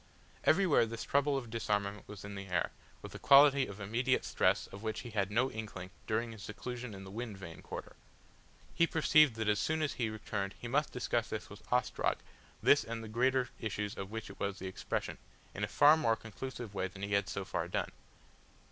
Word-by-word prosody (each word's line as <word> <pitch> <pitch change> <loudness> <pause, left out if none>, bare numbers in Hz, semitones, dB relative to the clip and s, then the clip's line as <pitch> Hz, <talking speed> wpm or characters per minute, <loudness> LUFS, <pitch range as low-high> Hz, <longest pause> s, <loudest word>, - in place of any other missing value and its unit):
Everywhere 160 -9 +5
this 115 +1 -5
trouble 140 0 +2
of 120 -4 -5
disarmament 105 -2 -1
was 105 -1 -9
in 100 - -6
the 100 0 -6
air, 90 -1 0 0.3
with - - -8
a - - -7
quality 140 -1 +7
of 100 +1 -9
immediate 120 +6 +1
stress - - +2
of 100 - -11
which 110 -1 -3
he 120 - -8
had 100 -3 0
no 125 +5 +2
inkling 105 -4 -6 0.2
during 115 +2 0
his 110 -2 -10
seclusion 120 +3 -6
in 95 - -9
the 95 - -9
Wind 110 -1 -5
Vane 85 -4 -9
quarter. - - -7 0.8
He 170 - +4
perceived 155 -5 +5
that 110 -1 -2
as 105 0 +3
soon 155 +8 0
as 150 - 0
he 115 -3 -1
returned 105 -2 -4
he 120 - -6
must 145 +5 +1
discuss 120 -2 -1
this 110 - -5
with 105 - -10
Ostrog, 125 -2 +1 0.5
this - - +6
and 115 0 -5
the - - -7
greater 125 +3 +2
issues 105 -2 -3
of 95 0 -5
which 110 -2 -6
it - - -15
was 100 0 -2
the 95 - -7
expression, 95 - -3 0.3
in - - -4
a - - +1
far 150 +2 +7
more 130 -8 +2
conclusive 115 0 -7
way 95 -1 -1
than 95 +2 -10
he 100 0 -2
had 100 -1 +2
so 100 - -3
far 85 -2 -2
done. 90 - -2
110 Hz, 210 wpm, -33 LUFS, 100-125 Hz, 0.8 s, quality